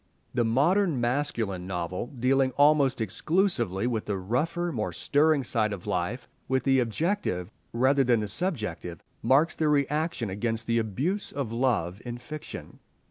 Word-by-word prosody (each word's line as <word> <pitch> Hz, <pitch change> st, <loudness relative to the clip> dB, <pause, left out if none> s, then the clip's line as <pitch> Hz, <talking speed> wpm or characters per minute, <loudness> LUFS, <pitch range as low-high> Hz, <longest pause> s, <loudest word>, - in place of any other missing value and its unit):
The 120 Hz, -, +2 dB
modern 145 Hz, -, +2 dB
masculine 120 Hz, -7 st, -1 dB
novel, 90 Hz, +3 st, -3 dB
dealing 130 Hz, +1 st, +1 dB
almost 145 Hz, -3 st, +4 dB
exclusively 120 Hz, -, 0 dB
with 115 Hz, -3 st, -1 dB
the 100 Hz, -2 st, -2 dB
rougher, 150 Hz, -, -1 dB
more 110 Hz, -, -2 dB
stirring 145 Hz, -, +2 dB
side 110 Hz, -3 st, 0 dB
of 100 Hz, -3 st, -6 dB
life, 95 Hz, +8 st, -2 dB, 0.2 s
with 130 Hz, 0 st, +1 dB
the 135 Hz, -1 st, +3 dB
objective 115 Hz, -, -1 dB, 0.2 s
rather 135 Hz, +4 st, +3 dB
than 120 Hz, -3 st, +3 dB
the 105 Hz, -, -2 dB
subjective, 105 Hz, -, -2 dB, 0.2 s
marks 135 Hz, +8 st, +3 dB
the 155 Hz, -, 0 dB
reaction 150 Hz, -, 0 dB
against 115 Hz, +3 st, -2 dB
the 115 Hz, 0 st, +1 dB
abuse 140 Hz, -, -1 dB
of 135 Hz, -5 st, -3 dB
love 115 Hz, -6 st, 0 dB
in 120 Hz, -1 st, -5 dB
fiction. 150 Hz, +5 st, -9 dB
125 Hz, 145 wpm, -27 LUFS, 110-145 Hz, 0.2 s, almost